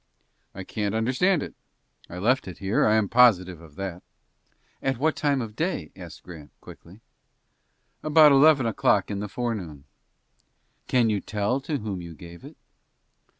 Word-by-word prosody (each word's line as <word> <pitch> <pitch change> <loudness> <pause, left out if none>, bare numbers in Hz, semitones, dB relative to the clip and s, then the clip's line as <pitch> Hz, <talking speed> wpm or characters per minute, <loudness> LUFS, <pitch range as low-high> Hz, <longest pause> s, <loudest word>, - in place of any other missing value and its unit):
"I 95 - -7
can't 105 +1 -3
understand 130 +10 +1
it. - - -8 0.6
I 90 - -8
left 125 +7 +1
it 90 - -8
here, 100 +2 +1
I 105 - +3
am 110 -2 +2
positive 95 -8 +3
of 80 -3 -16
that." 95 -1 -6 0.8
"At 135 -2 -1
what 155 +2 0
time 140 -3 0
in - - -5
the - - -20
day?" 135 - -3
asked 90 -3 -12
Grant, 80 -5 -12
quickly. 95 +6 -15 1.0
"About 155 -1 +6
eleven 140 -1 +5
o'clock 105 -3 +1
in 100 - -3
the 105 0 -5
forenoon." 95 - -5 1.0
"Can 120 -3 +2
you 105 - 0
tell 105 +5 -2
to 145 +2 -3
whom 105 -6 -5
you 85 -1 -10
gave 85 +2 -13
it?" - - -13
105 Hz, 160 wpm, -25 LUFS, 90-130 Hz, 1.0 s, About